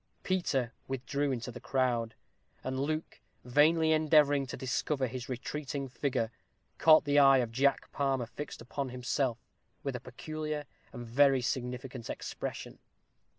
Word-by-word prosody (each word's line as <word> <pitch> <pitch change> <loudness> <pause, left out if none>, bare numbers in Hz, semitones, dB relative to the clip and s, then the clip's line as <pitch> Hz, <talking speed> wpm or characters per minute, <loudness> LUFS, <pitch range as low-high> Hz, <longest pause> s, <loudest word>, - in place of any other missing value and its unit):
Peter 135 -10 0
withdrew 135 +2 -1
into 125 -1 -3
the 125 - -9
crowd; 120 -4 0 0.5
and 130 0 -2
Luke, 155 +3 -2 0.3
vainly 160 +5 +4
endeavoring 150 -3 +4
to - - -6
discover 130 +1 -1
his 130 +1 -6
retreating 140 +2 -4
figure, 125 -3 -1 0.5
caught 155 -1 +7
the 145 0 +4
eye 135 -1 +7
of 120 -3 0
Jack 135 +4 +1
Palmer 135 -3 0
fixed 125 +5 -7
upon 135 +3 -4
himself, 125 0 -1 0.5
with 140 -2 -2
a - - -3
peculiar 150 +4 -5 0.3
and 120 -2 -7
very 135 +2 +4
significant 125 0 -3
expression. - - -5
135 Hz, 135 wpm, -31 LUFS, 125-145 Hz, 0.5 s, caught